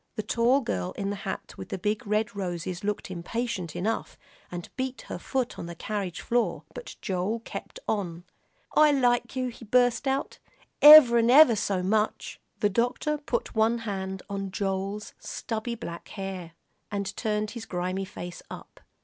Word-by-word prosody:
The 215 Hz, -, -3 dB
tall 235 Hz, +5 st, +3 dB
girl 90 Hz, -, -2 dB
in 200 Hz, 0 st, -3 dB
the -, -, -2 dB
hat 195 Hz, -1 st, -5 dB
with -, -, -6 dB
big 210 Hz, +2 st, -1 dB
red 215 Hz, +2 st, 0 dB
roses 180 Hz, -1 st, -4 dB
looked 205 Hz, -2 st, -2 dB
impatient 185 Hz, -1 st, -3 dB
enough, 215 Hz, +6 st, -2 dB, 0.3 s
and 175 Hz, -1 st, -6 dB
beat 260 Hz, 0 st, -3 dB
her -, -, -6 dB
foot 260 Hz, -2 st, -2 dB
on -, -, -5 dB
the 170 Hz, -, -7 dB
carriage 195 Hz, -2 st, -4 dB
floor, 240 Hz, 0 st, 0 dB
but -, -, -8 dB
Joel 195 Hz, +5 st, -1 dB
kept 230 Hz, -, -8 dB
on. 175 Hz, -5 st, -2 dB, 0.5 s
"I 305 Hz, -1 st, +6 dB
like 245 Hz, -3 st, +2 dB
you," 255 Hz, -1 st, -1 dB
he 235 Hz, -, -12 dB
burst 245 Hz, +4 st, +2 dB
out, 270 Hz, +1 st, -1 dB, 0.4 s
"ever'n 245 Hz, -6 st, +10 dB
ever 260 Hz, -2 st, +8 dB
so 195 Hz, -3 st, -1 dB
much." 210 Hz, +3 st, 0 dB, 0.2 s
The 205 Hz, -, +4 dB
doctor 245 Hz, +8 st, 0 dB
put 275 Hz, -5 st, -2 dB
one 225 Hz, +1 st, +3 dB
hand 190 Hz, -2 st, -4 dB
on 195 Hz, -1 st, -4 dB
Joel's 195 Hz, +1 st, -3 dB
stubby 230 Hz, 0 st, -4 dB
black 170 Hz, -7 st, -7 dB
hair, 190 Hz, -4 st, -6 dB, 0.4 s
and 200 Hz, -1 st, -3 dB
turned 210 Hz, -2 st, -1 dB
his 230 Hz, -2 st, -7 dB
grimy 185 Hz, +2 st, -2 dB
face 175 Hz, -2 st, -8 dB
up. -, -, -10 dB
210 Hz, 160 wpm, -27 LUFS, 190-240 Hz, 0.5 s, ever'n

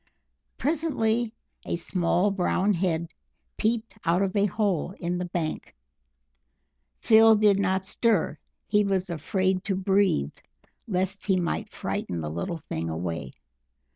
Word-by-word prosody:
Presently 245 Hz, -7 st, 0 dB, 0.3 s
a -, -, -2 dB
small 175 Hz, +3 st, +1 dB
brown 195 Hz, +1 st, +1 dB
head 170 Hz, -2 st, -1 dB, 0.4 s
peeped 225 Hz, 0 st, -1 dB
out 175 Hz, +4 st, +2 dB
of 195 Hz, 0 st, -2 dB
a 200 Hz, 0 st, +3 dB
hole 195 Hz, -3 st, -1 dB
in 175 Hz, 0 st, -2 dB
the 180 Hz, -, -2 dB
bank. 170 Hz, -3 st, -4 dB, 1.3 s
Phil 225 Hz, 0 st, +7 dB
did 205 Hz, -2 st, +4 dB
not 190 Hz, -1 st, +1 dB
stir; 205 Hz, -7 st, +1 dB, 0.3 s
he 210 Hz, 0 st, +3 dB
was 190 Hz, -2 st, 0 dB
afraid 185 Hz, +4 st, 0 dB
to 200 Hz, -2 st, 0 dB
breathe 190 Hz, -, +2 dB, 0.5 s
lest 190 Hz, 0 st, -2 dB
he 190 Hz, -2 st, +3 dB
might 170 Hz, -, -2 dB
frighten 85 Hz, -, -3 dB
the 75 Hz, -1 st, -4 dB
little 85 Hz, -, -3 dB
thing 80 Hz, -, -4 dB
away. 80 Hz, -5 st, -4 dB
190 Hz, 130 wpm, -26 LUFS, 170-210 Hz, 1.3 s, Phil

